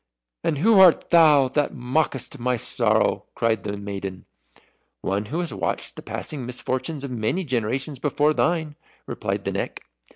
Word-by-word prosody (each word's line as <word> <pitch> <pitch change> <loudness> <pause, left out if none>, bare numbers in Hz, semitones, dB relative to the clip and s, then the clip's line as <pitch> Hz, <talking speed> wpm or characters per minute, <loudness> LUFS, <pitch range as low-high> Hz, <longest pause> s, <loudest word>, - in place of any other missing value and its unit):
"And 150 - 0
who 205 +6 +5
art 185 -3 +6
thou 155 -5 +6
that 145 +2 0
mockest 135 +1 -1
my 125 +1 +1
sorrow?" - - +1
cried 110 -3 +1
the 100 +2 -4
maiden. 100 -2 -6 0.8
"One 100 +2 -1
who 160 +11 -2
has 170 -9 -4
watched 95 - -3
the - - -8
passing 145 -4 -4
misfortunes 130 +4 -2
of 140 - -5
many 120 +11 -1
generations 130 +1 -2
before 150 +1 +2
thine," 160 -2 0 0.3
replied - - -3
the - - -2
Neck. - - -4
135 Hz, 155 wpm, -24 LUFS, 115-155 Hz, 0.8 s, art